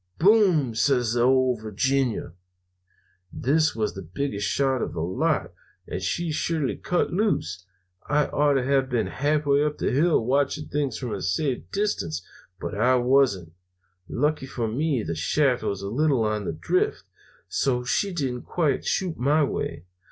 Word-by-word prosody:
"'Boom!' 180 - +4
says 120 -1 +2
the 120 - +1
Ole 130 0 +4
Virginia. 115 -2 -1 1.0
"This 155 +3 +1
was 110 -2 -1
the 95 - -7
biggest 100 - -3
shot 135 -3 +1
of - - -3
the 85 - -4
lot, 90 +3 -1 0.3
and 90 - -5
she 165 - -1
surely 155 -2 -1
cut 175 -1 -1
loose. 95 - -1 0.4
I 150 0 +3
ought 145 0 +2
to 130 - +1
have 135 0 +1
been 120 -3 0
halfway 145 0 +1
up 150 0 -1
the - - -1
hill 150 -3 +2
watching 140 +3 0
things 145 -2 -1
from 125 -4 -4
a - - -4
safe 125 +8 -1
distance, 90 - -2 0.3
but - - -5
I 125 +5 +3
wasn't. 125 -9 +2 0.6
Lucky 150 0 0
for 120 -4 -3
me 135 +1 0
the 85 - -3
shaft 125 - +1
was 100 -1 -3
a - - -3
little 135 0 +2
on 105 -1 -1
the - - -2
drift, 95 - 0 0.4
so 125 -2 0
she 195 +10 0
didn't 135 -8 -2
quite 160 -5 0
shoot 180 -4 -1
my 145 +5 +3
way. 90 - -3
130 Hz, 160 wpm, -25 LUFS, 110-150 Hz, 1.0 s, Boom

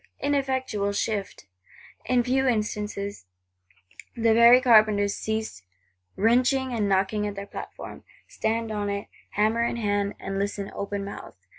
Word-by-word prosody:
Ineffectual 260 -8 -1
shift! 200 - -3 0.6
In 250 -1 +2
few 265 +2 +1
instants, 210 -3 -1
the 90 - -5
very 235 +2 +8
carpenters 215 -5 +4
cease 220 - -4 0.5
wrenching 255 +4 +2
and 210 -3 0
knocking 200 +2 +1
at 205 - -5
their 200 0 -6
platform; - - -9 0.2
stand 225 0 -2
on 205 -1 -2
it, 200 0 -4 0.2
hammer 220 +3 +2
in 235 - -1
hand, 205 -3 -1
and 195 0 -4
listen 200 0 -3
open 200 0 -4
mouthed. 200 - -9
210 Hz, 130 wpm, -25 LUFS, 200-235 Hz, 0.6 s, very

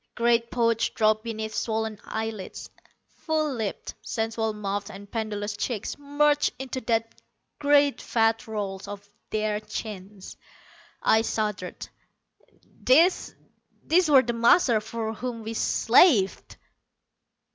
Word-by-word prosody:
Great 235 0 +2
pouches 230 -2 +1
dropped 215 -1 +1
beneath 220 -1 -5
swollen 220 -2 -2
eyelids. 220 -3 -6 0.3
Full 310 -3 -2
lipped, 220 -5 -4
sensual 225 0 -2
mouths 205 -1 -4
and 200 0 -11
pendulous 210 -2 -3
cheeks 215 0 -3
merged 290 +1 +2
into 260 0 -5
the 225 -1 +1 0.6
great 285 -1 +3
fat 225 -1 +1
rolls 200 -3 -4
of 205 0 -8 0.2
their 215 -1 -1
chins. 210 -2 -8 0.7
I 220 - +4
shuddered. 210 -5 -3 1.0
These, 325 +9 +4 0.5
these 345 0 +3
were 270 -3 +7
the 240 - -2
masters 235 -1 +4
for 225 -1 -4
whom 235 0 -5
we 220 +1 -5
slaved! 225 - +3
225 Hz, 115 wpm, -26 LUFS, 210-245 Hz, 1.0 s, were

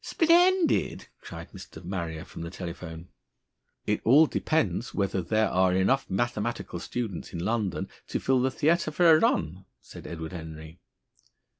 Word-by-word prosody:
"Splendid!" 350 +1 +3
cried - - -9
Mr. - - -11
Marrier 85 -4 -4
from - - -10
the 85 - -5
telephone. 85 -1 -8 0.8
"It 105 - 0
all 145 +7 +7
depends 110 - -1
whether 100 -1 0
there 110 +5 +1
are 95 0 +2
enough 115 +9 +2
mathematical 120 +2 -2
students 115 -8 -5
in 85 0 -4
London 110 -3 -1 0.2
to - - -2
fill 130 -1 +2
the 130 - +2
theater 160 +4 +1
for 170 +3 +3
a 155 - +7
run," 90 - 0
said - - -12
Edward 80 -1 -6
Henry. 80 -1 -9
100 Hz, 145 wpm, -27 LUFS, 85-130 Hz, 0.8 s, all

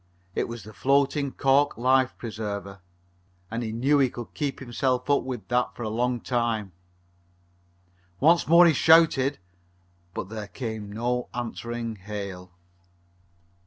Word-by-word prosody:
It - - -1
was 115 -2 -7
the 110 - -12
floating 140 +2 +1
cork 140 +2 +2
life 130 +2 +3
preserver, 100 -4 -5 0.7
and 115 +1 -2
he 110 -2 -3
knew 135 +6 +2
he 135 -2 +4
could 120 -1 -9
keep 145 -3 -3
himself 125 0 -1
up 140 - +4
with 125 -5 -5
it 125 +2 +2
for 120 - -6
a 110 - -2
long 120 +2 -1
time. 115 -5 -1 1.5
Once 165 +4 +4
more 170 +3 +8
he 165 - +5
shouted, 150 -3 +4 0.8
but 95 - -4
there 110 -1 -6
came 110 -3 -6
no 120 +3 -2
answering 120 -1 -4
hail. 95 -2 -7
120 Hz, 135 wpm, -26 LUFS, 110-135 Hz, 1.5 s, more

